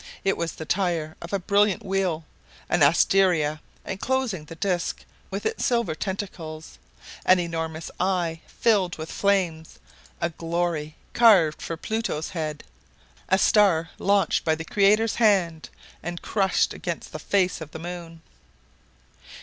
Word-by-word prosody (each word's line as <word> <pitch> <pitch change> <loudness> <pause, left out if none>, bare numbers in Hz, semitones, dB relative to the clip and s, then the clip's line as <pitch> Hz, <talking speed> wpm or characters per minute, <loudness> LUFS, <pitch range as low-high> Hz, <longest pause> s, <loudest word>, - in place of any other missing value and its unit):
It 195 - +2
was 170 -1 -3
the 160 - -7
tire 170 -4 -1
of 170 - -8
a 200 - +1
brilliant 205 +2 +2
wheel, 190 -5 -1 0.4
an - - +1
asteria 165 -6 +4 0.2
enclosing 225 -5 -2
the 165 - -10
disc 175 0 -2 0.2
with - - -5
its 445 +1 -1
silver 235 - +1
tentacles, 165 -4 -6 0.4
an 185 - +6
enormous 165 -2 -3
eye 175 -3 0
filled 200 -6 +1
with 160 0 -6
flames, 180 -6 0 0.4
a 170 - -1
glory 165 -2 -2 0.2
carved 190 -10 +5
for 165 - -4
Pluto's 220 -5 -3
head, 155 -4 -4 0.7
a 190 - +5
star 190 -5 +3
launched 200 0 +2
by 160 -1 +2
the 165 +1 -7
Creator's 210 +4 +3
hand, 180 -7 +2 0.3
and 175 0 -6
crushed 195 -3 +1
against 170 -2 -5
the 155 - -6
face 185 +1 +1
of 160 - -7
the 160 - -8
moon! 165 -1 -8
175 Hz, 135 wpm, -25 LUFS, 160-200 Hz, 0.7 s, an